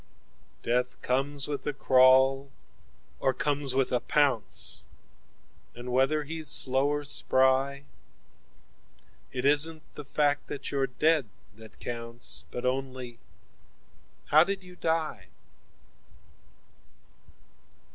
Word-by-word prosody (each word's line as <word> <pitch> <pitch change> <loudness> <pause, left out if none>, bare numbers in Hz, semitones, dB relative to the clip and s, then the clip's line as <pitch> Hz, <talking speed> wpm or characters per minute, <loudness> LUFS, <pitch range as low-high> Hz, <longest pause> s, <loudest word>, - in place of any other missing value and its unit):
21Death 125 +1 -1
comes 135 +2 0
with 145 -1 -5
a 145 - -1
crawl, 130 +1 +4 0.7
or 130 -1 0
comes 145 -2 -1
with 135 -1 +1
a 125 - +2
pounce,22 120 - -3
And 125 +1 -6
whether 135 +4 +2
he's 160 0 -4
slow 130 +1 +3
or 145 0 -1
spry,23It 140 -1 +2 1.6
isn't 155 +2 +3
the 150 - -8
fact 145 +1 0
that 140 - -6
you're 135 -1 0
dead 150 -1 +1 0.3
that 110 -1 -15
counts,24 115 0 -4
But 125 - -6
only 130 -2 -4 1.1
how 155 +2 +7
did 195 +1 -4
you 180 0 -14
die? 160 - -2
135 Hz, 100 wpm, -28 LUFS, 125-145 Hz, 1.6 s, how